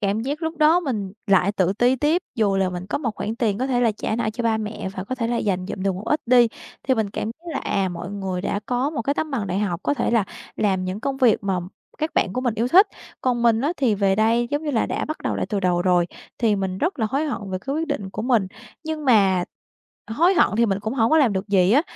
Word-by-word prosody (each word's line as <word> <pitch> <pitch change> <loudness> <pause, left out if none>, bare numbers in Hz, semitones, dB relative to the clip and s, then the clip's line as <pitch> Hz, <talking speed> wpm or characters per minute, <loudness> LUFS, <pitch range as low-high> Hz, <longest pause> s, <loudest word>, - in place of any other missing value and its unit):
Cảm 205 +1 0
giác 290 +6 -3
lúc 320 0 -2
đó 310 +4 +5
mình 210 - -3
lại 200 0 +3
tự 190 -2 +1
ti 245 +5 +2
tiếp, 310 +7 +1
dù 205 -5 +1
là 190 -1 +1
mình 180 +1 -6
có 210 - -2
một 230 -7 -3
khoản 220 +2 -4
tiền 215 -5 0
có 260 - 0
thể 245 -2 +1
là 230 -3 +3
trả 220 +1 -3
nợ 235 - -1
cho 240 +1 -4
ba 225 -1 +2
mẹ 210 -2 -4
và 185 0 -5
có 255 - -3
thể 230 -3 -2
là 240 0 -1
dành 185 -4 -1
dụm 190 - -5
được 195 -1 +1
một 190 - -6
ít 300 - +1
đi, 240 -1 +6 0.3
thì 260 - +2
mình 215 -3 -1
cảm - - -3
thấy 320 +9 -7
là, - - -2
à, 195 -2 -1
mọi 175 +2 -6
người 190 -3 -3
đã 200 +1 -2
có 255 +4 0
một 270 -7 -3
cái 280 +4 0
tấm 310 - -2
bằng 230 -7 -2
đại 185 +2 -1
học, 185 -4 -1
có 290 - +1
thể - - -1
là 230 -4 +3 0.3
làm 190 -3 +1
những 185 +3 -4
công 275 +1 -2
việc 250 -5 +4
mà 190 -2 0 0.4
các 310 +1 -2
bạn 185 - +1
của 255 - -2
mình 245 -4 0
yêu 230 +3 0
thích. 385 +7 +7 0.3
Còn 245 -2 0
mình 230 -1 +4
á, 295 +5 0
thì 245 -6 +2
về 195 -1 +2
đây, 230 +2 +2
giống 290 +2 -1
như 300 - -2
là, 230 - +1
đã - - -2
bắt 310 - -5
đầu - - -1
lại - - -2
từ 205 -3 -1
đầu 175 -1 +1
rồi, 180 -2 +3 0.3
thì 220 -4 +2
mình 190 -1 -3
rất 330 -2 -1
là 220 - +1
hối 285 +3 0
hận 210 -7 -4
về 185 - -2
cái 275 +1 -3
quyết 320 +1 -1
định 205 - -3
của 215 - -5
mình. 235 -6 +2 0.4
Nhưng 315 -1 -4
mà 195 -7 +4 0.6
hối 340 - +3
hận - - +5
thì 235 0 +4
mình 195 -1 -1
cũng 220 +5 -3
hổng 225 -3 +2
có 315 - +5
làm 250 -8 +4
được 190 +2 -3
gì 190 0 +4
á, 290 +5 +5
225 Hz, 285 wpm, -23 LUFS, 195-270 Hz, 0.6 s, thích